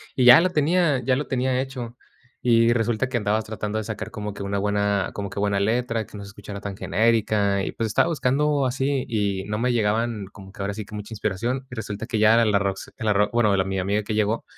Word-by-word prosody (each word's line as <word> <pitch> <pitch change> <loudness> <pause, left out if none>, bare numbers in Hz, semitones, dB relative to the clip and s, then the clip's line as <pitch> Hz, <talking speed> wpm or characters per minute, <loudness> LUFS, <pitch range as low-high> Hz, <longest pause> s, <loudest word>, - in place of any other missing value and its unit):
y 130 - +2
ya 125 +5 +10
lo 185 - +2
tenía 155 -2 +2
ya 130 +1 +2
lo 145 - -3
tenía 130 -1 0
hecho. 125 -3 -6 0.5
Y 115 -1 +4
resulta 120 +1 0
que 130 -1 -1
andabas 110 -1 0
tratando 110 0 -4
de 110 - -2
sacar 110 -1 -5
como 105 -1 -5
que - - -9
una 100 0 -2
buena 100 -1 0
como 100 -1 -4
que - - -11
buena 100 -1 +1
letra, 115 +1 0
que - - -11
no 100 - -7
se 100 - -10
escuchara 100 0 -9
tan 100 -1 -6
genérica, 105 -1 +1
y - - -3
pues, 115 - -3
estaba 110 +8 +2
buscando 145 -2 +1
así 135 +1 -1
y 100 -4 -1
no 105 +1 -3
me 125 +1 +1
llegaban, 110 -1 0
como 95 0 -13
que 100 - -18
ahora 100 +1 -2
sí, 110 +1 -5
que 105 - -11
mucha 105 +2 -7
inspiración. 115 +6 -2
Y 125 - -8
resulta 110 -1 -5
que 115 - -2
ya 110 +1 +5
era 115 0 +5
la 105 -2 +3
Rox, 100 -1 -2
eh, 120 - -7
la 105 -1 +2
ro 105 +1 +2
bueno, 110 -4 +3
la 95 - +2
mi 95 0 -3
amiga 100 +3 0
que 105 +1 -4
llegó, 110 +1 0
110 Hz, 250 wpm, -24 LUFS, 100-125 Hz, 0.5 s, ya